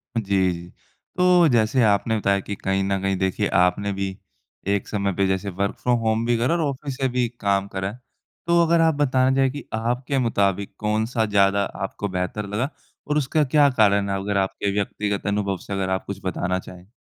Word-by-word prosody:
जी, 115 - +1 0.3
जी। 85 +1 -9 0.5
तो 180 -2 +5
जैसे 120 +1 +3
आपने 110 +1 +2
बताया 100 -1 +1
कि 100 +1 -5
कहीं 95 0 -1
न 95 0 0
कहीं 95 0 0
देखिए 95 +2 0
आपने 100 +3 +1
भी 95 0 -4 0.5
एक 100 -1 0
समय 100 -2 -1
पे 100 -1 +2
जैसे 95 +1 -1
वर्क 100 +2 -2
फ्रॉम 125 -1 +2
होम 110 0 0
भी 120 -1 +2
करा 125 +8 +1
और 170 - 0
ऑफ़िस 140 -2 -3
से 135 - +1
भी 125 -1 0
काम 100 -1 +1
करा, 95 0 -3 0.6
तो 170 0 +4
अगर 165 0 +3
आप 160 -2 +3
बताना 130 -2 +2
चाहें 135 -1 +3
कि 145 +2 -7
आपके 125 +5 -1
मुताबिक 100 -5 0
कौन-सा 110 +2 0
ज़्यादा 100 -1 +3 0.2
आपको 100 +1 -3
बेहतर 90 +3 -3
लगा 110 +7 -2 0.4
और 150 0 +1
उसका 150 +2 +1
क्या 145 +1 +4
कारण 100 -5 +3
है? 100 - 0
अगर 100 0 -1
आपके 100 +1 -1
व्यक्तिगत 100 0 -2
अनुभव 100 -1 0
से 100 - -4
अगर 95 -1 -1
आप 95 0 -1
कुछ 100 - -6
बताना 90 0 -1
चाहें? 90 0 -12
105 Hz, 195 wpm, -23 LUFS, 100-125 Hz, 0.6 s, तो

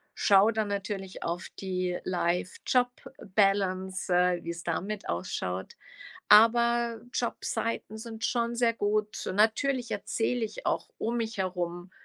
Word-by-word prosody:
schaue 200 +2 +5
dann 220 -1 0
natürlich 200 -1 -4
auf 170 +1 -3
die 185 -2 -2
Life-Job-Balance, 190 0 0
äh, 180 0 +2
wie's 170 0 -5
da 170 - -1
mit 210 +2 -5
ausschaut. 90 +1 -3 0.6
Aber 235 +1 +5
Jobseiten 230 -2 -2
sind 225 0 -7
schon 235 -1 0
sehr 235 -1 +3
gut. 215 0 -1
Natürlich 235 +4 +2
erzähle 230 +3 -1
ich 215 -1 -7
auch - - 0
um 230 +2 -1
mich 225 0 -3
herum, 180 -1 -3
205 Hz, 120 wpm, -29 LUFS, 180-230 Hz, 0.6 s, schaue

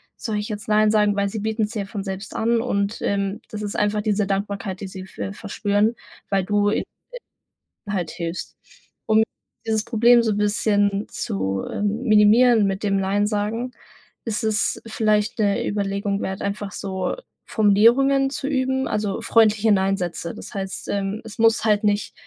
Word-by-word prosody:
soll 220 -3 -3
ich 210 +2 -5
jetzt 210 0 -6
Nein 215 0 +4
sagen?“, 210 -1 +3
weil 200 0 0
sie 215 - -4
bieten's 220 0 -1
dir 210 -4 -3
von 200 -1 -5
selbst 195 +1 -6
an 230 +1 +1
und, 200 -2 -1
ähm, 200 0 -1
das 210 -1 -6
ist 205 - -4
einfach 210 0 +1
diese 210 -1 +1
Dankbarkeit, 200 -1 -3
die 195 - -4
sie 190 0 -8
ver 195 +1 -6
verspüren, 205 +1 0 0.4
weil 195 -1 +2
du 205 0 +2
ihnen - - -1 1.0
halt 190 -4 -2
hilfst. 170 +1 -5 0.5
Um 220 0 +4 0.4
dieses 220 -1 0
Problem 235 +1 +4
so 220 - +1
'n 205 - -1
bisschen 205 -1 +1
zu, 95 0 -3
ähm, 210 +4 -2
minimieren 220 0 +5
mit 195 +1 -3
dem 195 -1 +1
Nein 200 +2 +1
sagen, 215 +4 -2 0.5
ist 225 -1 -2
es 220 0 0
vielleicht 215 0 0
'ne 200 -2 +1
Überlegung 200 0 -1
wert, 190 0 -4
einfach 200 0 -3
so 190 -2 -3 0.3
Formulierungen 240 +6 +4
zu 275 0 -4
üben, 265 -1 0
also, 210 -2 -2
freundliche 220 -1 +3
Nein-Sätze. 190 -4 0
Das - - -10
heißt, 195 -2 -5
ähm, 200 +2 -2
es 220 -1 -10
muss 225 0 +4
halt 210 -1 +3
nicht 205 0 0
210 Hz, 165 wpm, -22 LUFS, 200-220 Hz, 1.0 s, minimieren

